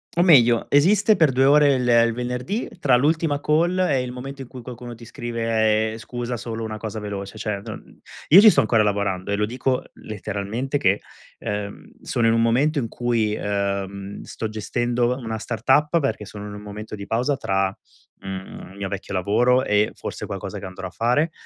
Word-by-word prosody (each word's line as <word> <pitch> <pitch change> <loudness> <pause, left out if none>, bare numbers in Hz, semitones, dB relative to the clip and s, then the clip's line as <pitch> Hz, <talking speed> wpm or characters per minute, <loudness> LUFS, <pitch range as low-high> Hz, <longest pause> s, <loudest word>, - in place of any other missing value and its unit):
O 175 - +4
meglio, 120 -9 +5
esiste 200 +9 +4
per 160 -6 +4
2 130 +1 +2
ore, 145 0 +6
il 125 -1 -1
il 115 -1 +4
venerdì, 125 - -3
tra 130 -3 +4
l'ultima 150 +2 +1
call 170 +5 +1
e 150 -8 +2
il 125 -1 -5
momento 135 +2 -7
in 130 - -8
cui 125 0 -10
qualcuno 120 -1 -8
ti 115 - -13
scrive: 110 -3 0
"Scusa, 120 +1 -5
solo 115 0 -5
una 110 -1 -4
cosa 110 0 -5
veloce". 100 0 -6
Cioè, 105 -2 -3
non - - -10 0.3
io 180 +6 +10
ci 215 - +9
sto - - +4
ancora 110 0 +3
lavorando, 100 -2 -1
eh. - - +2
Lo 105 +1 +1
dico 125 +3 -1
letteralmente 110 +6 -4
che, 100 -2 +2 0.4
ehm, 105 0 -5
sono 120 - -1
in 115 - +4
un 115 - +2
momento 135 +7 +2
in 120 - -2
cui, 115 -3 0
ehm, 100 -1 -3
sto 110 - -5
gestendo 120 +3 -1
una 115 -3 -4
startup, 150 +8 +2
perché 110 -8 -2
sono 105 +1 -8
in 105 - -8
un 105 - -8
momento 105 +1 -8
di 100 - -8
pausa 125 +7 0
tra, 95 -3 +1 0.5
mhmm, 95 -1 -8
il 95 - -14
mio 100 -1 -3
vecchio 100 0 -6
lavoro 120 +7 +2
e, 105 -2 +2
forse, - - -6
qualcosa - - -6
che - - -7
andrò 95 0 -7
a - - -9
fare. 125 - +1
115 Hz, 195 wpm, -23 LUFS, 105-130 Hz, 0.5 s, io